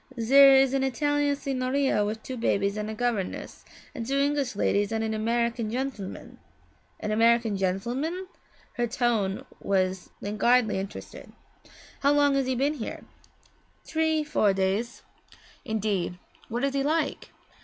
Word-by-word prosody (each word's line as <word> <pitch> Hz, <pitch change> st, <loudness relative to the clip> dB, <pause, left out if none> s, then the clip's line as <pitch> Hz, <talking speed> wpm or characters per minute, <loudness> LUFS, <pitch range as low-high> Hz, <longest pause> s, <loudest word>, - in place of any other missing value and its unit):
Zer 275 Hz, +4 st, +7 dB
is 265 Hz, 0 st, +4 dB
an 270 Hz, -1 st, +1 dB
Italian 290 Hz, +2 st, +1 dB
signora 265 Hz, -3 st, 0 dB
wif 215 Hz, +2 st, -4 dB
two 260 Hz, -, -5 dB
babies 200 Hz, -4 st, 0 dB
and 210 Hz, 0 st, -3 dB
a 220 Hz, -, -5 dB
governess, 230 Hz, -5 st, -3 dB, 0.3 s
and 230 Hz, -, -5 dB
two 270 Hz, +4 st, -1 dB
English 280 Hz, -3 st, 0 dB
ladies 205 Hz, +1 st, +1 dB
and 225 Hz, 0 st, -1 dB
an 220 Hz, 0 st, -1 dB
American 230 Hz, +1 st, 0 dB
gentleman 240 Hz, -5 st, -5 dB, 0.3 s
' -, -, -37 dB
'An 210 Hz, -, -2 dB
American 230 Hz, 0 st, +3 dB
gentleman?' 240 Hz, -, -2 dB, 0.5 s
Her 240 Hz, 0 st, +1 dB
tone 225 Hz, -5 st, 0 dB
was 185 Hz, -1 st, -1 dB
languidly 220 Hz, +1 st, +2 dB
interested. 195 Hz, +1 st, -8 dB, 0.7 s
'How 280 Hz, +1 st, +3 dB
long 290 Hz, -1 st, +4 dB
has 275 Hz, -1 st, +1 dB
he 260 Hz, -, 0 dB
been 280 Hz, +4 st, +1 dB
here?' 255 Hz, -7 st, -6 dB, 0.8 s
'Tree 315 Hz, -1 st, +1 dB
four 290 Hz, -10 st, +2 dB
days.' 195 Hz, +5 st, -1 dB, 0.6 s
'Indeed 210 Hz, -6 st, -1 dB, 0.3 s
what 240 Hz, +3 st, -3 dB
is 275 Hz, -1 st, +1 dB
he 275 Hz, -, +1 dB
like?' 310 Hz, +4 st, -1 dB
240 Hz, 145 wpm, -27 LUFS, 210-275 Hz, 0.8 s, Zer